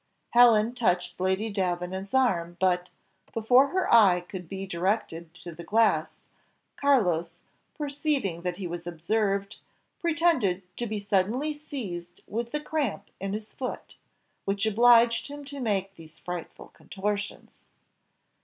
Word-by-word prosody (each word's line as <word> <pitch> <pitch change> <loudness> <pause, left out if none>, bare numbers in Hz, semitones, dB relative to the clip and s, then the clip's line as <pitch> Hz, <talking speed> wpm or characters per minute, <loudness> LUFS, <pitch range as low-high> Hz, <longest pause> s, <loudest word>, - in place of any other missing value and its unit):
Helen 235 -1 +6
touched 180 -9 0
Lady 190 +4 0
Davenant's 190 +2 -2
arm, 175 -10 +1
but, 180 -1 +1 0.4
before 245 +5 +5
her 375 +5 0
eye 195 -6 +6
could 180 -1 -9
be 195 0 -5
directed 170 -2 -2
to 180 -1 -9
the 170 +2 -9
glass, 225 +3 +2 0.6
Carlos, 180 - +2 0.4
perceiving 280 - -1
that 180 0 -3
he 195 - -5
was 175 0 -5
observed, 200 +4 -1 0.4
pretended 320 - +1
to 240 - -2
be 215 0 -3
suddenly 210 +9 0
seized 200 - -7
with 230 +2 -3
the 300 - -1
cramp 285 -10 -2
in 195 +1 -3
his 215 +1 -6
foot, 255 - -6 0.5
which 200 +1 -1
obliged 230 +2 +5
him 290 0 -8
to 280 0 -7
make 195 -5 -1
these 160 -3 -14
frightful 175 -2 -7
contortions. 205 +1 -5
200 Hz, 130 wpm, -27 LUFS, 180-240 Hz, 0.6 s, Helen